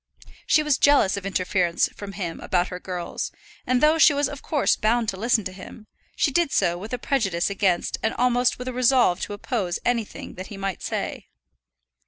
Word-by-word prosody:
She 310 Hz, -, +4 dB
was 300 Hz, -3 st, +1 dB
jealous 285 Hz, -10 st, +4 dB
of 200 Hz, -1 st, -5 dB
interference 180 Hz, -2 st, +1 dB
from 200 Hz, -1 st, -9 dB
him 175 Hz, -5 st, -5 dB
about 180 Hz, -1 st, 0 dB
her 180 Hz, -, -6 dB
girls, 180 Hz, -2 st, -5 dB, 0.4 s
and 255 Hz, +1 st, +2 dB
though 310 Hz, +2 st, +5 dB
she 310 Hz, -2 st, +6 dB
was 285 Hz, -1 st, +1 dB
of 285 Hz, 0 st, -8 dB
course 295 Hz, -3 st, +1 dB
bound 230 Hz, +1 st, +1 dB
to 195 Hz, -, -3 dB
listen 225 Hz, +2 st, +1 dB
to 185 Hz, -, -5 dB
him, 200 Hz, +3 st, -11 dB, 0.3 s
she 290 Hz, -, +1 dB
did 340 Hz, 0 st, +1 dB
so 170 Hz, -, +2 dB
with 200 Hz, +5 st, -8 dB
a 250 Hz, -, -1 dB
prejudice 200 Hz, -9 st, 0 dB
against 190 Hz, -3 st, 0 dB
and 220 Hz, -, -1 dB
almost 245 Hz, 0 st, +2 dB
with 250 Hz, -, -7 dB
a 255 Hz, -, -3 dB
resolve 250 Hz, -7 st, +3 dB
to -, -, -4 dB
oppose 205 Hz, -4 st, -2 dB
anything 235 Hz, -3 st, -2 dB
that 185 Hz, -, -7 dB
he 205 Hz, -, -9 dB
might 195 Hz, -2 st, -4 dB
say. -, -, -4 dB
215 Hz, 200 wpm, -24 LUFS, 185-255 Hz, 0.4 s, she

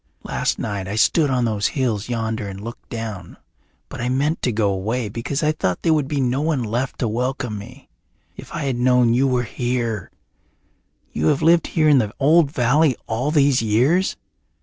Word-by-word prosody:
Last -, -, -1 dB
night 100 Hz, -2 st, -4 dB
I 100 Hz, -, -4 dB
stood 145 Hz, +6 st, +3 dB
on 125 Hz, -2 st, +1 dB
those 105 Hz, -2 st, 0 dB
hills 115 Hz, -5 st, -1 dB
yonder 115 Hz, -2 st, -2 dB
and 95 Hz, -1 st, -7 dB
looked 115 Hz, +3 st, -9 dB
down, 110 Hz, -6 st, -6 dB, 0.5 s
but -, -, -8 dB
I 120 Hz, -, -1 dB
meant 145 Hz, +5 st, 0 dB
to 125 Hz, -, +1 dB
go 105 Hz, -2 st, +1 dB
away 110 Hz, +4 st, -2 dB
because 120 Hz, +7 st, -3 dB
I 155 Hz, -, +3 dB
thought 95 Hz, -, -2 dB
there 165 Hz, -, +3 dB
would 150 Hz, -3 st, 0 dB
be 145 Hz, 0 st, -2 dB
no 130 Hz, +1 st, 0 dB
one 150 Hz, -5 st, 0 dB
left 120 Hz, +4 st, -2 dB
to 120 Hz, -, +1 dB
welcome 120 Hz, -1 st, -2 dB
me. 125 Hz, +6 st, -12 dB, 0.5 s
If -, -, -11 dB
I 155 Hz, -, -4 dB
had 135 Hz, -3 st, -1 dB
known 125 Hz, -1 st, +3 dB
you 130 Hz, +3 st, +3 dB
were 125 Hz, -2 st, +1 dB
here! 120 Hz, -4 st, -2 dB, 1.0 s
You 75 Hz, +1 st, -1 dB
have 135 Hz, -, +2 dB
lived 165 Hz, +1 st, +4 dB
here 155 Hz, -2 st, +1 dB
in 145 Hz, -3 st, +6 dB
the 105 Hz, -3 st, -2 dB
old 150 Hz, +2 st, +4 dB
valley 135 Hz, +2 st, +2 dB
all 120 Hz, +6 st, -1 dB
these 140 Hz, -4 st, +3 dB
years?" 125 Hz, -, +2 dB
125 Hz, 195 wpm, -21 LUFS, 110-140 Hz, 1.0 s, in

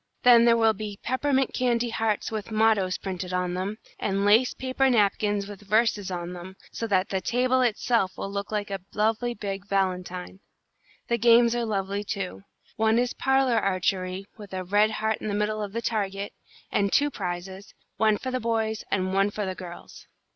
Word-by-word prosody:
Then 235 Hz, -1 st, +7 dB
there 230 Hz, -1 st, +5 dB
will 225 Hz, -1 st, +4 dB
be 210 Hz, -1 st, -6 dB
peppermint 265 Hz, +1 st, +1 dB
candy 240 Hz, -1 st, +1 dB
hearts 220 Hz, -2 st, -1 dB
with 215 Hz, -1 st, -4 dB
mottoes 215 Hz, -4 st, +2 dB
printed 185 Hz, -1 st, -5 dB
on 180 Hz, -1 st, -1 dB
them, 190 Hz, +4 st, -3 dB, 0.2 s
and 195 Hz, 0 st, 0 dB
lace 225 Hz, +5 st, +4 dB
paper 260 Hz, +1 st, +1 dB
napkins 205 Hz, -3 st, +2 dB
with 205 Hz, -1 st, -9 dB
verses 210 Hz, -1 st, +1 dB
on 175 Hz, -1 st, -4 dB
them, 180 Hz, +2 st, -9 dB, 0.2 s
so 230 Hz, -, -4 dB
that 190 Hz, -2 st, +1 dB
the 190 Hz, -1 st, -1 dB
table 255 Hz, +5 st, +2 dB
itself 230 Hz, -4 st, +1 dB
will 195 Hz, -, -4 dB
look 200 Hz, +1 st, -4 dB
like 210 Hz, -1 st, -2 dB
a 195 Hz, -1 st, -3 dB
lovely 225 Hz, +3 st, +1 dB
big 200 Hz, -2 st, -5 dB
valentine. 185 Hz, -2 st, -2 dB, 0.7 s
The 235 Hz, 0 st, 0 dB
games 235 Hz, +1 st, +6 dB
are 240 Hz, -1 st, 0 dB
lovely, 200 Hz, -1 st, -2 dB
too. 195 Hz, -2 st, -4 dB, 0.4 s
One 220 Hz, +1 st, +3 dB
is 245 Hz, 0 st, +1 dB
parlour 265 Hz, -3 st, +2 dB
archery, 185 Hz, 0 st, -1 dB
with 205 Hz, -2 st, -10 dB
a 185 Hz, -, -3 dB
red 205 Hz, +4 st, +3 dB
heart 220 Hz, 0 st, -1 dB
in -, -, -4 dB
the 205 Hz, -, -1 dB
middle 210 Hz, +1 st, -1 dB
of 205 Hz, -1 st, -4 dB
the 230 Hz, +2 st, -4 dB
target, 200 Hz, -2 st, -2 dB, 0.4 s
and 200 Hz, -1 st, +1 dB
two 290 Hz, 0 st, +3 dB
prizes, 190 Hz, 0 st, -6 dB, 0.2 s
one 215 Hz, -1 st, +3 dB
for 260 Hz, -, -5 dB
the 255 Hz, -, -1 dB
boys 220 Hz, -2 st, -1 dB
and 185 Hz, -1 st, 0 dB
one 195 Hz, +1 st, +3 dB
for 205 Hz, 0 st, -3 dB
the 190 Hz, -, -3 dB
girls." 175 Hz, -2 st, -11 dB
210 Hz, 185 wpm, -26 LUFS, 195-230 Hz, 0.7 s, Then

